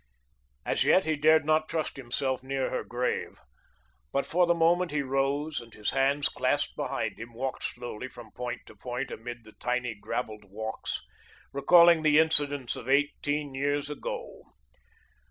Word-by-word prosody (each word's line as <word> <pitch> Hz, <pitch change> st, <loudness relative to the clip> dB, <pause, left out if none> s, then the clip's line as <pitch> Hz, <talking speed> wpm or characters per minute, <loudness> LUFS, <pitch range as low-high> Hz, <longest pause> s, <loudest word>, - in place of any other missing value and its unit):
As -, -, +2 dB
yet 190 Hz, -, +4 dB
he 160 Hz, 0 st, +1 dB
dared 155 Hz, +1 st, +4 dB
not 155 Hz, 0 st, +2 dB
trust 160 Hz, -2 st, -2 dB
himself 130 Hz, 0 st, -2 dB
near 135 Hz, 0 st, -2 dB
her -, -, -2 dB
grave, 125 Hz, +1 st, -2 dB, 0.7 s
but, 140 Hz, -, 0 dB
for 175 Hz, +1 st, +2 dB
the 170 Hz, -, +4 dB
moment, 170 Hz, +2 st, +3 dB
he 150 Hz, -2 st, -1 dB
rose 140 Hz, +3 st, 0 dB
and, 115 Hz, 0 st, -14 dB
his 105 Hz, -, -1 dB
hands 140 Hz, +2 st, +2 dB
clasped -, -, 0 dB
behind -, -, -3 dB
him, 115 Hz, +1 st, -8 dB
walked 130 Hz, +3 st, -3 dB
slowly 120 Hz, 0 st, -5 dB
from 120 Hz, -4 st, -12 dB
point 125 Hz, +1 st, -5 dB
to -, -, -14 dB
point 125 Hz, +1 st, -4 dB
amid 120 Hz, +1 st, -7 dB
the 110 Hz, -, -14 dB
tiny 125 Hz, -1 st, -1 dB
gravelled 110 Hz, 0 st, -5 dB
walks, 110 Hz, +3 st, -4 dB, 0.5 s
recalling 170 Hz, +4 st, +6 dB
the 155 Hz, -1 st, +4 dB
incidents 145 Hz, -5 st, +3 dB
of 125 Hz, -, -8 dB
eighteen 145 Hz, +1 st, +1 dB
years 145 Hz, +2 st, -1 dB
ago. -, -, -6 dB
135 Hz, 155 wpm, -28 LUFS, 125-155 Hz, 0.7 s, recalling